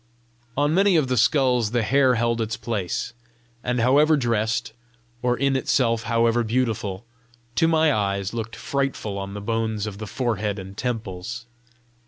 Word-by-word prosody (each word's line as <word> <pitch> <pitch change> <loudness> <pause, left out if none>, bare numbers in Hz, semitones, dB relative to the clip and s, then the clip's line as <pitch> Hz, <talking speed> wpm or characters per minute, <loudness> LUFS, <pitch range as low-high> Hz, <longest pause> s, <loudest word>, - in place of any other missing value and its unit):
On 145 +1 +2
many 195 +1 +4
of 150 -5 +2
the 130 - +1
skulls 125 -4 +3
the 120 0 0
hair 130 +2 +3
held 115 0 0
its 110 0 -2
place, 105 0 -3 0.5
and 125 0 0
however 145 +6 +4
dressed, 115 -2 0 0.5
or 125 0 +1
in 140 0 +1
itself 115 -3 +1
however 115 0 +3
beautiful, 115 -4 -1 0.5
to 165 - +3
my 160 -2 +3
eyes 100 -1 -1
looked 115 -1 -4
frightful 135 -7 -2
on 100 +1 -6
the 105 - -5
bones 110 -1 -1
of 105 -2 -6
the 110 - -5
forehead 110 -4 -1
and 95 0 -8
temples. 115 -1 -4
115 Hz, 155 wpm, -24 LUFS, 105-130 Hz, 0.5 s, many